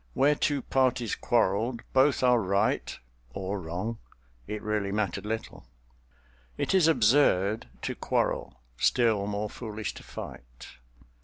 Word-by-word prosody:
Where 140 +3 +4
two 145 -2 0
parties 125 -4 +1
quarreled, 115 +1 +1
both 135 0 +4
are 125 -2 +5
right—or 95 - -2
wrong—it 85 - -7
really 105 -2 -1
mattered 105 -1 -2
little. 110 - -5 0.9
It - - 0
is 185 -4 +5
absurd 110 - +3 0.2
to - - -2
quarrel—still 100 - 0
more 105 +1 -2
foolish 110 -1 -5
to - - -11
fight. - - -10
105 Hz, 105 wpm, -28 LUFS, 95-120 Hz, 0.9 s, are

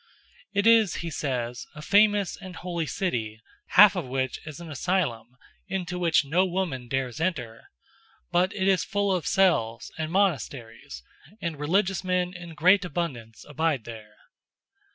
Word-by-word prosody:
"It 200 - 0
is," 225 -4 +5
he 165 - -4
says, 125 -5 -3
"a 150 - -8
famous 205 0 +3
and 185 -2 -10
holy 170 -3 -4
city, 120 - -2 0.4
half 205 +1 +9
of 180 - -2
which 130 0 -2
is 155 -1 -8
an 170 -2 -9
asylum, 130 -8 -2 0.3
into 180 -2 -3
which 165 -4 +3
no 165 +7 +2
woman 175 -9 -2
dares 130 +3 -3
enter; 130 -11 -3 0.6
but 180 +2 +2
it 190 -2 0
is 190 -4 +3
full 200 -1 0
of 175 - -3
cells 120 - +1
and 155 0 -3
monasteries; 125 - -2 0.4
and 165 -4 -4
religious 185 +5 +1
men 180 -1 0
in 175 -2 -10
great 185 +6 +4
abundance 140 -11 -5
abide 150 -3 -1
there." 110 -2 -11
170 Hz, 150 wpm, -26 LUFS, 130-185 Hz, 0.6 s, half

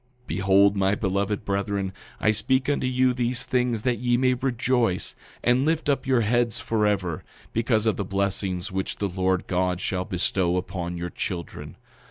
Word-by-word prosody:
9:3 - - -33
Behold, 100 +2 +4
my 100 0 +2
beloved 100 +1 -1
brethren, 100 -1 -1 0.3
I 110 - +3
speak 130 +5 +1
unto 145 -3 +1
you 130 0 +2
these 120 0 -1
things 125 -3 0
that 125 -4 +1
ye 120 0 +2
may 130 0 +3
rejoice, 125 -5 0 0.3
and 125 +2 +3
lift 160 0 0
up 140 -1 0
your 130 -3 +3
heads 120 +1 +1
forever, 105 -7 0 0.3
because 115 -1 +1
of 110 - +1
the 100 - -1
blessings 95 0 -1
which 95 0 -2
the 100 - -1
Lord 95 0 0
God 90 -1 0
shall 90 -1 -2
bestow 90 -1 0
upon 90 -1 -4
your 85 +1 -4
children. 85 -3 -5
105 Hz, 170 wpm, -25 LUFS, 95-120 Hz, 0.3 s, Behold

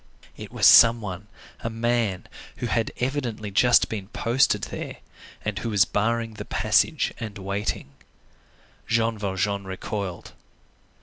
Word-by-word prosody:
It - - -10
was - - 0
some 115 +1 +8
one, 100 -2 -7 0.3
a 115 - -4
man, 115 -4 -1 0.3
who - - -5
had 115 -1 0
evidently 125 -6 -3
just 120 +5 +4
been 100 -4 -5
posted 120 +5 +1
there, - - -6 0.5
and 105 -2 -2
who 115 - -3
was 100 -3 +4
barring 115 +2 -1
the 105 - -7
passage - - +1
and 110 -3 -6
waiting. 100 -6 -3 1.0
Jean 115 -1 +1
Valjean 100 0 -2
recoiled. 95 -1 -5
110 Hz, 130 wpm, -24 LUFS, 100-115 Hz, 1.0 s, some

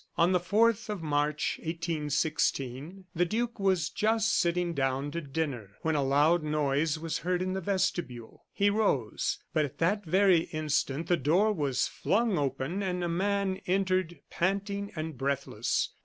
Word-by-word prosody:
On 170 +2 +4
the 180 - +3
4th 215 +5 +2
of 205 -5 -4
March, 150 0 0
1816, 155 -1 -2
the 175 -1 +2
duke 230 +5 -2
was 190 -5 +2
just 220 0 +1
sitting 175 0 +1
down 135 0 -1
to 170 - -3
dinner 135 - -4
when 160 - +1
a 145 - +1
loud 145 +5 +3
noise 150 0 0
was 165 0 -3
heard 180 +1 0
in 185 +1 -2
the 190 - -2
vestibule. 175 - -2
He 200 0 +2
rose 170 - 0 0.2
but 155 - +3
at 140 - -5
that 200 +5 +1
very 180 -1 +4
instant 155 -1 -1
the 175 +1 +2
door 175 +10 +3
was 145 -8 0
flung 215 -2 0
open 140 +6 -2
and 180 -2 -2
a - - 0
man 195 +2 0
entered, 185 -2 0
panting 200 +2 -1
and 155 -4 -5
breathless. 135 -5 -1
170 Hz, 155 wpm, -29 LUFS, 145-190 Hz, 0.2 s, On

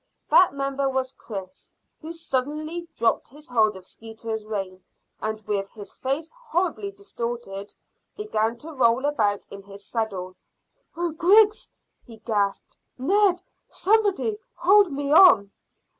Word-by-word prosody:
That 365 -6 +6
member 275 0 -1
was 260 -1 -1
Chris, 200 +2 -9 0.3
who 320 +1 -7
suddenly 310 +2 -3
dropped 230 0 +1
his 295 +3 -12
hold 220 -4 +2
of 190 -1 -11
Skeeter's 220 0 -7
rein, 190 -3 -5 0.4
and 215 0 -2
with 200 -2 -2
his 205 -3 -10
face 280 +5 -2
horribly 400 -5 -2
distorted, 235 - -6 0.4
began 235 - -1
to 315 +6 -10
roll 250 0 +3
about 210 -9 0
in 200 - -9
his 200 0 -13
saddle. 195 -5 -3 0.6
"Oh, 345 -1 -1
Griggs!" 410 +7 +4 0.3
he 230 -3 -13
gasped. 205 -3 -2 0.2
"Ned! 365 +6 +2 0.2
Somebody! 425 +1 +1 0.2
Hold 395 0 +5
me 280 0 -3
on." 305 - +7
260 Hz, 130 wpm, -24 LUFS, 215-345 Hz, 0.6 s, on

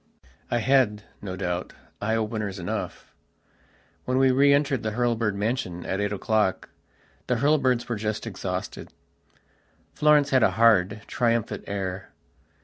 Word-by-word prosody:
I 120 - +1
had, 120 -4 +2 0.2
no 95 -2 -5
doubt, 90 -1 -3 0.3
eye 110 +2 0
openers 110 -3 -2
enough. 90 -2 -5 0.9
When 130 +1 0
we 135 0 +4
re 140 +2 +5
entered 140 -3 +2
the 110 -1 -3
Hurlbird 115 -3 0
mansion 100 -4 -2
at 95 +2 -2
eight 105 0 -1
o'clock 105 -1 0 0.6
the 125 - +1
Hurlbirds 130 -2 +2
were 120 - -2
just 110 +1 -3
exhausted. 95 -3 -5 1.0
Florence 150 -1 +4
had 130 -1 +4
a - - +5
hard, 105 -3 +4
triumphant 115 -2 -1
air. 95 -2 -4
110 Hz, 135 wpm, -25 LUFS, 100-125 Hz, 1.0 s, re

